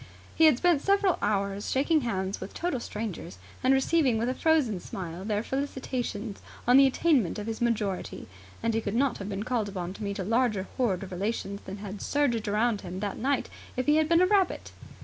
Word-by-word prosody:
He 320 - +5
had 310 -6 +6
spent 345 -2 +3
several 395 0 +2
hours 200 -1 -1
shaking 295 +4 +2
hands 195 -5 -2
with - - -7
total 340 -7 -1
strangers 210 - -6 0.3
and 260 - +4
receiving 270 -2 +3
with 230 +2 0
a - - 0
frozen 285 - +2
smile 175 0 -6
their 210 +1 -1
felicitations 255 -6 -3 0.3
on 250 +2 +7
the 275 0 +8
attainment 265 - +2
of 210 - -4
his 225 +1 -4
majority, 210 -5 -1 0.4
and 230 0 +1
he 225 - +1
could 205 0 -3
not 270 +2 +1
have 200 0 -5
been 200 0 -3
called 225 -3 -1
upon 185 -2 -4
to 215 - -8
meet 200 -1 -3
a 190 - -2
larger 220 -2 +1
horde 200 -8 0
of 190 - -9
relations 200 +1 -3
than 190 +1 -6
had 205 0 -7
surged 245 -7 0
round 215 +1 +1
him 185 0 -6
that 200 -1 -3
night 270 +2 0 0.3
if 255 - 0
he 295 +1 +4
had 315 -1 +2
been 335 +1 +5
a - - +6
rabbit. 390 -1 +1
230 Hz, 205 wpm, -28 LUFS, 200-270 Hz, 0.4 s, the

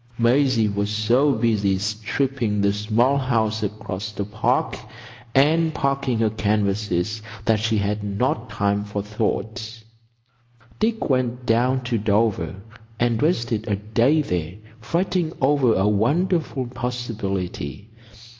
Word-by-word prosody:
Maisie 120 -1 +3
was 100 0 -1
so 115 +7 +3
busy 110 -4 +1
stripping 105 +2 -1
the 100 0 +2
small 115 +7 +2
house 110 -4 0
across 105 0 -4
the 100 -2 -4
Park, 110 +2 0 0.6
and 160 +4 +3
packing 140 -3 0
her 110 -1 +2
canvases, 105 -1 0 0.2
that 110 -2 +3
she 110 0 +1
had 105 +1 -1
not 115 +3 -1
time 100 0 0
for 105 -1 -4
thought. 110 +2 -3 1.0
Dick 220 +1 0
went 125 -2 0
down 125 +3 +2
to 120 -2 -1
Dover 100 -5 +1 0.4
and 120 -2 +1
wasted 115 -9 0
a 105 - +1
day 115 +9 +2
there 90 - -3 0.2
fretting 170 +5 -1
over 135 -3 +3
a 95 +2 +2
wonderful 145 - +1
possibility. 110 - -4
110 Hz, 120 wpm, -23 LUFS, 105-130 Hz, 1.0 s, Maisie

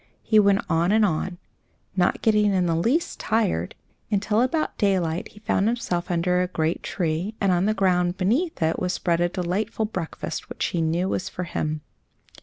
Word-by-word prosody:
He 215 - +4
went 200 -1 +4
on 170 +2 +2
and 220 0 +4
on, 175 0 -1 0.6
not 180 -1 +1
getting 210 -2 +4
in 180 -1 +2
the 165 -1 +1
least 240 - 0
tired, 210 - 0 0.3
until 210 +1 +1
about 310 +5 0
daylight 180 -5 +1
he 210 - -16
found 205 -1 +1
himself 225 -7 -1
under 180 +1 +1
a 180 - 0
great 165 -2 -1
tree, 175 +4 -2
and 195 -2 +2
on 180 +1 +2
the 215 - +1
ground 180 -2 +2
beneath 235 - 0
it 160 +1 +1
was 180 0 -1
spread 170 -2 0
a 175 - +2
delightful 190 +6 -2
breakfast, 180 -6 -5
which - - -2
he 170 - -1
knew 165 +3 0
was 185 - -2
for 180 - -5
him. 155 -3 -3
185 Hz, 185 wpm, -24 LUFS, 170-210 Hz, 0.6 s, He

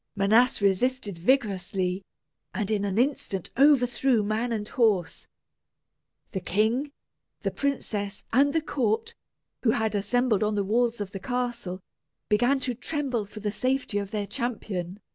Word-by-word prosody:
Manas 215 +3 +3
resisted 200 -1 +1
vigorously, 190 -4 +1 0.5
and 210 -2 -1
in 205 -2 +1
an 195 0 -2
instant 235 - 0
overthrew 255 -3 +4
man 220 +4 -1
and 210 -2 -2
horse. 210 -10 +1 1.0
The 190 - -2
king, 220 - 0 0.5
the - - -1
princess, 210 -8 -2
and 280 +4 +5
the 320 +2 +1
court, 270 - -1 0.5
who 240 - +2
had 220 -1 +1
assembled 215 +2 +1
on 210 0 +1
the 200 - +1
walls 230 +2 +1
of 195 -2 -4
the 195 - -6
castle, 240 -4 -3 0.5
began 245 +6 +3
to 250 -1 0
tremble 250 -3 -2
for 210 +1 -10
the 210 0 -1
safety 255 0 0
of 200 -1 -4
their 210 -1 -2
champion. 205 -5 -4
220 Hz, 145 wpm, -27 LUFS, 200-250 Hz, 1.0 s, and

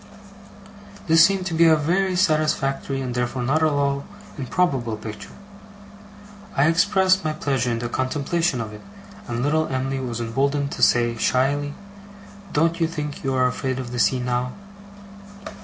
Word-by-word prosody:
This 165 0 +6
seemed 190 0 +2
to 180 - -3
me 160 - -2
to - - +7
be - - +7
a 160 - +6
very 180 +5 0
satisfactory 155 -6 0
and 125 -2 -3
therefore 125 +1 -2
not 145 +6 +1
at 160 - +4
all 140 -1 0 0.3
improbable 130 -5 -1
picture. 105 0 -8 1.3
I 140 - +4
expressed 190 +3 +3
my 155 -1 -1
pleasure 135 -5 -1
in 115 - -1
the 120 +1 -3
contemplation 140 +3 -1
of 110 -1 -6
it, 105 - -11 0.5
and 120 0 -2
little 155 +2 +1
Em'ly 135 +1 -2
was 120 -3 -4
emboldened 140 +5 -1
to - - -6
say, 120 -1 +3
shyly, 140 +5 0 0.8
'Don't 165 +3 +1
you 165 - +2
think 150 -2 -5
you 135 -1 -1
are 130 0 +3
afraid 130 +1 -2
of 125 -2 -5
the 125 - -3
sea, 130 +1 +3
now? 125 0 -2
140 Hz, 165 wpm, -23 LUFS, 125-160 Hz, 1.3 s, to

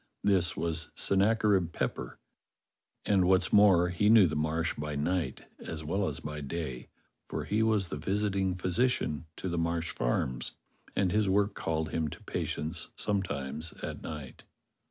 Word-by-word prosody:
This 95 -3 +2
was 80 -1 -1
Sennacherib 100 -3 +3
Pepper, 65 - -3 0.9
and, 95 -3 +3
what's 95 0 +3
more, 95 -4 +6
he 95 +4 +2
knew 110 -3 +8
the 80 - -1
Marsh 80 +2 0
by 75 0 -4
night 75 -2 -1
as 80 -1 -6
well 95 +6 0
as 75 +1 -3
by 75 0 -5
day, 70 -3 -5 0.4
for - - -3
he 105 +2 +1
w^as 105 -5 +2
the 75 - -4
visiting 95 +2 0
phy 95 0 -3
sician 90 -7 +1
to - - -5
the 85 -2 -1
Marsh 85 0 -1
farms, - - -1 0.4
and 95 -3 +2
his 105 -1 +2
work 100 +1 +2
called 80 -4 -2
him 80 -1 0
to - - -9
patients 80 +1 -3
sometimes 80 -6 -2
at - - -5
night. 75 -4 -8
85 Hz, 155 wpm, -30 LUFS, 75-100 Hz, 0.9 s, knew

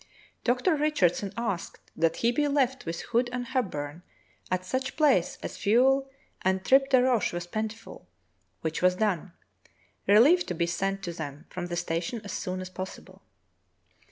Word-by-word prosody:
Dr. 255 +8 +2
Richardson 205 - +1
asked 200 -7 -3 0.2
that 165 0 +2
he 235 - +2
be 295 +4 +1
left 265 - 0
with 165 0 -3
Hood 240 +1 0
and 250 0 -3
Hepburn 170 - -3 0.5
at 185 0 -1
such 260 +7 -2
place 275 - +3
as - - -5
fuel 265 +5 +3 0.3
and 190 0 0
tripe 270 +1 +5
de 260 -2 +5
roche 245 -8 +2
were 175 - -1
plentiful, 215 - -6 0.5
which 160 0 -2
was 180 0 +4
done, 190 -4 -1 0.7
relief 270 - +6
to 180 - -3
be 170 - +1
sent 195 +3 -2
to 175 -2 -4
them 150 -1 -7
from 180 -1 -4
the 175 - -3
station 170 +8 -2
as 205 - -7
soon 185 -2 -3
as 185 - -6
possible. 185 +1 -8
200 Hz, 160 wpm, -28 LUFS, 175-255 Hz, 0.7 s, relief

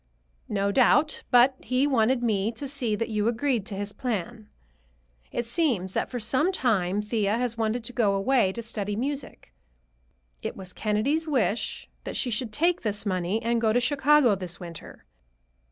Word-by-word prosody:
"No 200 -1 0
doubt; 280 +6 +3
but 250 +2 +6
he 255 +2 +1
wanted 250 -2 +2
me 215 -2 +1
to 275 +5 -6
see 260 -6 -1
that 230 +2 -3
you 210 -1 0
agreed 235 -2 0
to 205 - -5
his 205 +1 -4
plan. 225 -2 -4 0.8
It 240 - -2
seems 230 - 0
that - - -1
for 245 - -4
some 265 - +2
time 205 - +1
Thea 210 -1 0
has 245 -1 -1
wanted 225 +1 -1
to 250 +2 -5
go 210 -5 +2
away 215 -1 +2
to 235 - -6
study 210 -3 -4
music. 270 - -5 0.9
It - - -5
was 185 -2 -6
Kennedy's 255 +10 0
wish 230 - -1 0.2
that - - -6
she 250 - -1
should 225 0 -2
take 340 +8 +1
this 210 -1 -2
money 185 +3 -1
and 235 0 +1
go 220 -1 +3
to 240 - +3
Chicago 280 -1 +4
this 180 -3 -5
winter. 170 -3 -10
230 Hz, 170 wpm, -26 LUFS, 205-255 Hz, 0.9 s, but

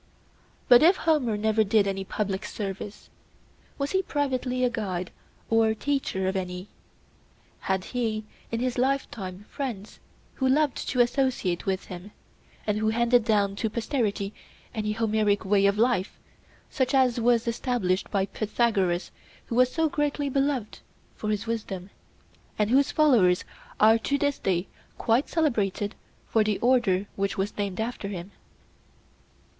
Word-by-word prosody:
But, 245 -1 +8
if 345 +5 +6
Homer 285 -10 +1
never 220 +1 +2
did 210 0 +3
any 195 -1 -2
public 195 0 -3
service, 200 0 -6 0.7
was 280 0 -2
he 380 - +2
privately 260 -6 -1
a 250 - +4
guide 185 -6 -3 0.4
or 225 -1 +3
teacher 265 -8 -1
of 190 - -1
any? 180 0 -4 0.9
Had 190 -1 -1
he 220 -3 -2 0.3
in 230 0 -1
his 250 -1 -1
lifetime 215 -8 -2
friends 230 -7 -6 0.3
who 265 -1 0
loved 290 +1 +1
to 250 - +3
associate 240 -9 0
with 190 -1 -1
him, 180 +2 -9 0.6
and 210 0 0
who 220 0 +1
handed 235 +1 +3
down 205 -3 +2
to 220 - -1
posterity 215 -3 -1 0.4
an 210 -2 -2
Homeric 215 -2 +1
way 200 0 +4
of 200 +1 +1
life, 225 -4 +1 0.5
such 260 -1 0
as 255 -3 +3
was 235 0 +2
established 230 -6 0
by 195 -1 +1
Pythagoras 200 -5 0 0.3
who - - -6
was 250 +1 +4
so 325 0 +1
greatly 290 -1 -1
beloved 275 -5 -1 0.4
for 215 - -4
his 210 0 -1
wisdom, 205 -5 -4 0.7
and 210 +1 +1
whose 275 +2 +4
followers 235 - +4 0.4
are 220 +1 +6
to 280 +5 0
this 285 0 0
day 185 -1 0 0.3
quite 235 +5 +1
celebrated 215 - 0 0.3
for 220 - +3
the 210 -1 0
order 235 -6 +2
which 200 0 -1
was 195 +2 -2
named 200 -2 -3
after 225 -2 -3
him? 190 -1 -6
220 Hz, 145 wpm, -26 LUFS, 200-255 Hz, 0.9 s, But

